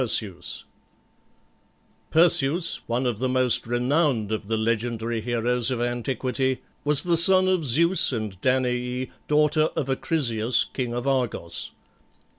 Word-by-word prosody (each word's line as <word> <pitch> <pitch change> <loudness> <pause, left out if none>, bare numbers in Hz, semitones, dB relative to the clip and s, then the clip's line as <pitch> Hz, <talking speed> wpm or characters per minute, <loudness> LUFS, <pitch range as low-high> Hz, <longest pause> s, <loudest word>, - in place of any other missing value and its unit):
PERSEUS. 100 -7 -2 1.5
Perseus, 165 0 +3
one 120 +2 -2
of 120 -4 -2
the 130 +1 -1
most 130 -3 +1
renowned 125 -2 0
of 110 -2 -4
the 110 +1 -1
legendary 115 0 -2
heroes 120 +1 0
of 125 -2 -2
antiquity, 125 +2 -2 0.2
was 145 -1 +1
the 175 -1 +1
son 185 +3 +5
of 185 -3 0
Zeus 170 +8 +5
and 105 -6 -5
Danaë, 125 0 -1 0.2
daughter 150 +1 +2
of 140 - -3
Acrisius, 125 -6 +1
king 125 -3 -4
of 120 +1 -4
Argos. 125 -11 -2
125 Hz, 125 wpm, -23 LUFS, 115-145 Hz, 1.5 s, son